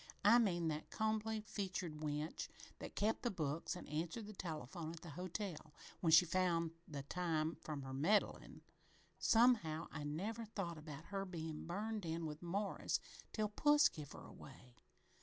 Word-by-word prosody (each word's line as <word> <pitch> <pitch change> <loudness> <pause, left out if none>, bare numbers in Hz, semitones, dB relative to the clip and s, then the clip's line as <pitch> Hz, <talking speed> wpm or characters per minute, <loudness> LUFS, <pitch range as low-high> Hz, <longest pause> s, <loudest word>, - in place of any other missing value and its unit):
I 230 +4 +9
mean 175 -7 +2
that 155 0 -3
combly 220 0 0
featured 185 -6 -3
wench 150 +1 -2 0.3
that - - -7
kep' 215 +2 +2
the 240 - +1
books 160 -2 -1
an' - - -8
answered 165 +9 -2
the 215 - -8
telephone 160 -2 -4
at 170 - -9
the 165 - -8
hotel 180 -2 -4 0.2
when 165 - +2
she 165 +3 +9
found 170 -2 +2 0.2
the 140 -3 -5
time 160 0 0
from 150 -3 -4
her 135 0 -5
meddlin'. 175 +10 +1 0.6
Somehow, 215 -10 +4
I 160 - -4
never 200 +11 -2
thought 190 -7 -4
about 150 0 -8
her 195 0 0
bein' 160 -4 -5
burned 210 +4 -2
in 165 0 -2
with 150 0 -5
Morris 195 +4 0 0.3
till 215 -1 0
puss 295 +7 +6
give 150 -3 -8
her - - -9
away. 130 -3 -12
170 Hz, 160 wpm, -40 LUFS, 155-205 Hz, 0.6 s, I